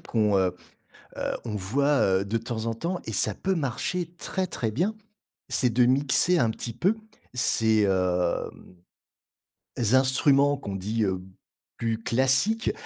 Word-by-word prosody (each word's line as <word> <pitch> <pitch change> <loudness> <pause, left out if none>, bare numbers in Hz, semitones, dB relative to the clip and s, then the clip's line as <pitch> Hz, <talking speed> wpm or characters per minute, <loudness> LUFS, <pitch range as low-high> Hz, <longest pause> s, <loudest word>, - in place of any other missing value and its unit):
qu'on, 105 -3 +1
heu 90 -1 +1 0.6
heu, - - -2
on 110 -3 -4
voit, 140 +9 +1 0.2
heu, 100 - -3
de 110 +3 -1
temps 115 -1 -5
en 115 - -1
temps- 175 +9 -3
et - - -5
ça - - +1
peut 190 0 -1
marcher 165 +4 -2
très, 190 +1 -3
très 120 -10 -3
bien- 175 - -1 0.5
c'est 125 - +2
de 120 +2 +3
mixer 140 +7 +3
un 115 -6 +2
petit 115 +1 -5
peu, 185 - +1 0.4
ces, 110 -3 +3
hem, 90 -2 -1 1.2
instruments, 140 +2 +3
qu'on 100 -8 -6
dit, 105 +4 -2
heu: 95 -1 -2 0.6
«plus 115 -1 -1
classiques», 135 - +2
120 Hz, 145 wpm, -26 LUFS, 105-145 Hz, 1.2 s, de